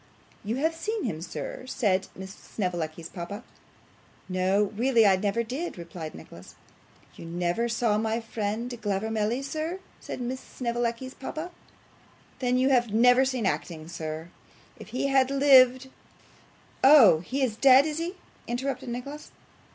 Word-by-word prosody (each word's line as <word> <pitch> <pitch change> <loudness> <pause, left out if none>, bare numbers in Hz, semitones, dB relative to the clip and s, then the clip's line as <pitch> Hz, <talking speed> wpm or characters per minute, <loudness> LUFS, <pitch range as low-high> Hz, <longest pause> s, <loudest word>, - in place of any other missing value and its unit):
'You 215 +3 -2
have 315 +5 0
seen 425 +6 -3
him, 155 -1 -3
sir?' 250 +7 -6
said 195 -8 0
Miss 190 +1 -8
Snevellicci's 170 -6 -4
papa. 200 +6 -7 0.8
'No, 190 +2 +1
really 235 0 +3
I 195 -2 +6
never 205 +4 0
did,' 265 - -5
replied 170 -2 -8
Nicholas. 85 - -13 0.6
'You - - -11
never 175 +7 -1
saw 230 -2 +1
my 220 +1 -1
friend 225 +1 -3
Glavormelly, 220 +4 -1
sir!' 315 +6 -4 0.2
said - - -7
Miss 250 +1 -3
Snevellicci's 240 +1 -3
papa. 310 +6 -6 0.9
'Then 250 -1 +1
you 260 +1 +3
have 240 -4 +2
never 245 +4 +5
seen 255 -4 -1
acting 160 -4 -3
yet. 160 +1 -5 0.5
If - - -10
he 245 +5 -2
had 270 -1 +3
lived 265 -2 +5 0.5
' - - -30
'Oh, 255 - +8
he 265 - -2
is 235 -5 0
dead, 265 +3 +6
is 310 0 -2
he?' 345 +3 -3 0.3
interrupted 255 +1 -3
Nicholas. 275 +5 -6
235 Hz, 145 wpm, -27 LUFS, 195-265 Hz, 0.9 s, Oh